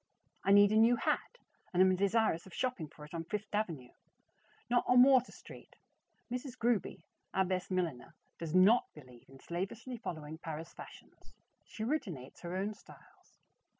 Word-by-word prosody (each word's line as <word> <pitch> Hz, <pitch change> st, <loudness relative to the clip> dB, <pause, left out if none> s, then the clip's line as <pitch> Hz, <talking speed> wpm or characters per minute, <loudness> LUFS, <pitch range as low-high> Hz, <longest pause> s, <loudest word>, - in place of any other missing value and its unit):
I 195 Hz, -, +2 dB
need 205 Hz, 0 st, +7 dB
a 215 Hz, -, +3 dB
new 230 Hz, +2 st, +6 dB
hat, -, -, -1 dB, 0.3 s
and 180 Hz, -, -1 dB
am 185 Hz, 0 st, +6 dB
desirous 200 Hz, -2 st, +1 dB
of 185 Hz, -, -12 dB
shopping 250 Hz, -11 st, -2 dB
for 150 Hz, +1 st, -13 dB
it 150 Hz, -, -16 dB
on 165 Hz, -1 st, -3 dB
Fifth 210 Hz, +5 st, -5 dB
Avenue, 165 Hz, -, -2 dB, 0.8 s
not 245 Hz, 0 st, +2 dB
on 250 Hz, 0 st, +7 dB
Water 260 Hz, -2 st, +5 dB
Street. -, -, -14 dB, 0.6 s
Mrs. 250 Hz, 0 st, -5 dB
Gruby, 230 Hz, -8 st, 0 dB, 0.3 s
our 190 Hz, -, +3 dB
best 185 Hz, 0 st, -2 dB
milliner, 165 Hz, -6 st, -2 dB, 0.2 s
does 165 Hz, 0 st, -4 dB
not 200 Hz, +6 st, +5 dB
believe 125 Hz, -5 st, -15 dB
in 135 Hz, 0 st, -15 dB
slavishly 200 Hz, -, -5 dB
following 160 Hz, -7 st, -6 dB
Paris 160 Hz, -1 st, -7 dB
Fashions; -, -, -14 dB, 0.3 s
she 220 Hz, -, -6 dB
originates 190 Hz, -, -3 dB
her 175 Hz, +1 st, -5 dB
own 200 Hz, +3 st, -1 dB
styles. 205 Hz, -, -19 dB
190 Hz, 160 wpm, -33 LUFS, 165-225 Hz, 0.8 s, need